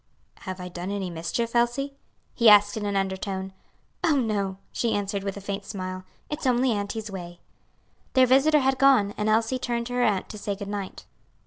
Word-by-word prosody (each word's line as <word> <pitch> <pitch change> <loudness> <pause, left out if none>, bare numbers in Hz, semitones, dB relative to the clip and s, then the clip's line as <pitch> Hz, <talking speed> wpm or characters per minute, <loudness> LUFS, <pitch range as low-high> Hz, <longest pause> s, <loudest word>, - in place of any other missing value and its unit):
"Have 185 0 -4
I 180 - -6
done 180 +1 -6
any 195 -3 -3
mischief, 225 +8 -3
Elsie?" 240 +4 +1 0.4
he 235 -2 +6
asked 205 0 +6
in 210 -2 -3
an 200 - -1
undertone. 190 0 -2 0.5
"Oh, 320 -3 +3
no!" 205 -7 0
she 235 - 0
answered 200 -1 -2
with 195 0 -4
a - - -7
faint 200 +1 -4
smile, 185 -1 -6 0.2
"it's 300 -2 -3
only 250 0 +3
auntie's 210 +1 -3
way." 175 -2 -8 0.7
Their 260 -1 +6
visitor 275 +4 +4
had 265 0 +1
gone, 260 -7 +5
and 210 0 -1
Elsie 225 +4 +2
turned 235 -2 -2
to 245 - -6
her 245 - +1
aunt 205 -5 +1
to 210 - -8
say 205 0 -3
good 200 0 -7
night. 200 -2 -5
205 Hz, 195 wpm, -26 LUFS, 195-245 Hz, 0.7 s, he